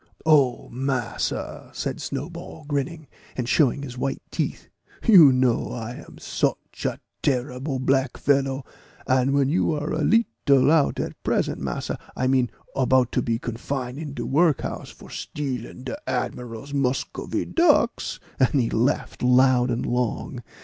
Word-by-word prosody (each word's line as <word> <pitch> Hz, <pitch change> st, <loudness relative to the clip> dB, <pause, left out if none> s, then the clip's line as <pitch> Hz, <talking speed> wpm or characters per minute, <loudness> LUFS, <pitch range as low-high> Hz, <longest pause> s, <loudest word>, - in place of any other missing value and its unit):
"Oh, 145 Hz, -6 st, +4 dB
massa," 130 Hz, -1 st, -3 dB
said -, -, -3 dB
Snowball, 160 Hz, +2 st, -6 dB
grinning, 145 Hz, +2 st, -2 dB, 0.3 s
and 125 Hz, -2 st, -2 dB
showing 140 Hz, +1 st, +3 dB
his 125 Hz, -3 st, -7 dB
white 135 Hz, +1 st, -2 dB
teeth, -, -, -3 dB, 0.4 s
"you 175 Hz, -, +9 dB
know 125 Hz, -2 st, +1 dB
I 120 Hz, +1 st, -5 dB
am -, -, -14 dB
soch -, -, 0 dB, 0.3 s
a -, -, 0 dB, 0.2 s
terrible 130 Hz, +1 st, -1 dB
black 130 Hz, 0 st, +1 dB
fellow 135 Hz, -1 st, +1 dB, 0.4 s
But 130 Hz, -1 st, +3 dB, 0.2 s
you 160 Hz, +3 st, +2 dB
are 150 Hz, 0 st, -2 dB
a 155 Hz, -, -1 dB
leetle 145 Hz, -, +3 dB
out 160 Hz, -3 st, +3 dB
at -, -, -4 dB
present, -, -, 0 dB
massa -, -, -3 dB, 0.2 s
I 130 Hz, -, -1 dB
meant, 130 Hz, -2 st, +3 dB, 0.3 s
about 130 Hz, -2 st, +3 dB
to 125 Hz, -, +1 dB
be 115 Hz, -1 st, 0 dB
confine 125 Hz, +2 st, -4 dB
in 150 Hz, -3 st, -6 dB
de -, -, -4 dB
work 155 Hz, +1 st, +3 dB
house -, -, -5 dB
for -, -, -14 dB
stealing 130 Hz, -4 st, -5 dB
de 130 Hz, -, -4 dB
admiral's 125 Hz, +3 st, -4 dB
Muscovy 135 Hz, -2 st, -1 dB
ducks;" 300 Hz, -8 st, +2 dB, 0.2 s
and 130 Hz, +2 st, +3 dB
he 115 Hz, -, 0 dB
laughed 120 Hz, +4 st, 0 dB
loud 125 Hz, 0 st, +4 dB
and 120 Hz, 0 st, -1 dB
long. 125 Hz, -2 st, -2 dB
130 Hz, 145 wpm, -24 LUFS, 125-145 Hz, 0.4 s, you